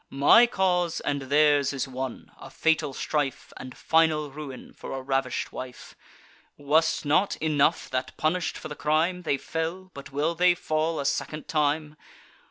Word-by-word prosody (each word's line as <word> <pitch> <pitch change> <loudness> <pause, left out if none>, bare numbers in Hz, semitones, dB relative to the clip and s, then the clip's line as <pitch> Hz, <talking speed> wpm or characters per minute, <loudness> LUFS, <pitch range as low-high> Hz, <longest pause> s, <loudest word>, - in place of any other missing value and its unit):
My 145 - +6
cause 180 -5 0
and 140 -1 -2
theirs 145 +1 +3
is 135 0 -2
one; 130 -1 -6
a - - -10
fatal 160 -3 +1
strife, 145 0 -3
And 130 0 -9
final 160 -2 +2
ruin, 140 -2 -9
for - - -8
a 135 - -4
ravish'd 135 -1 -1
wife. 130 -1 -9 0.6
Was 155 +3 +2
't - - -7
not 155 +7 +2
enough, 155 +1 +1
that, 130 0 -3
punish'd 170 +3 -1
for - - -7
the 150 - -6
crime, 160 +5 +1
They 150 -5 0
fell; 165 +6 -4
but 140 -1 -10
will 150 +4 0
they 180 +1 +4
fall 155 0 -1
a 140 - -3
second 150 +2 -2
time? 150 0 0
150 Hz, 165 wpm, -26 LUFS, 140-160 Hz, 0.6 s, My